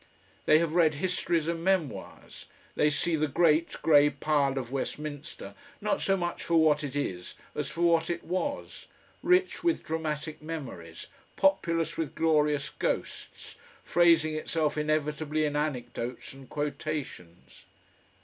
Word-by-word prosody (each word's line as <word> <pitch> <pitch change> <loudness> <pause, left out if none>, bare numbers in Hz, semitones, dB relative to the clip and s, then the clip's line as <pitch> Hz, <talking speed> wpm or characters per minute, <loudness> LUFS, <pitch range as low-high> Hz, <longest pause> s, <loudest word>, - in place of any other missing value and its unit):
They 155 - +7
have 165 -1 0
read 165 -3 +4
histories 170 -1 0
and 165 0 -2
memoirs, 185 -6 -2 0.3
they 150 - +3
see 160 +3 +1
the 155 0 +1
great 160 +2 +2
grey 145 -2 +6
pile 140 -1 0
of 125 -2 -4
Westminster 145 -6 -5 0.3
not 210 0 -1
so 195 0 +2
much 175 -1 -3
for 170 - 0
what 155 -2 +4
it 140 -1 -5
is 90 -11 -3 0.2
as 150 -2 -3
for 165 +3 -5
what 165 -1 +3
it 170 0 -2
was, 235 +12 -4 0.3
rich 365 +1 +2
with 340 -1 +1
dramatic 155 -1 -3
memories, 130 - -7 0.3
populous 170 -4 +1
with 160 -4 -3
glorious 150 -3 +2
ghosts, - - -4 0.3
phrasing 165 -2 +4
itself 155 0 -1
inevitably 155 0 0
in 145 -1 -2
anecdotes 125 -5 -3
and 135 -1 -14
quotations. 145 - -5
155 Hz, 135 wpm, -29 LUFS, 145-165 Hz, 0.3 s, They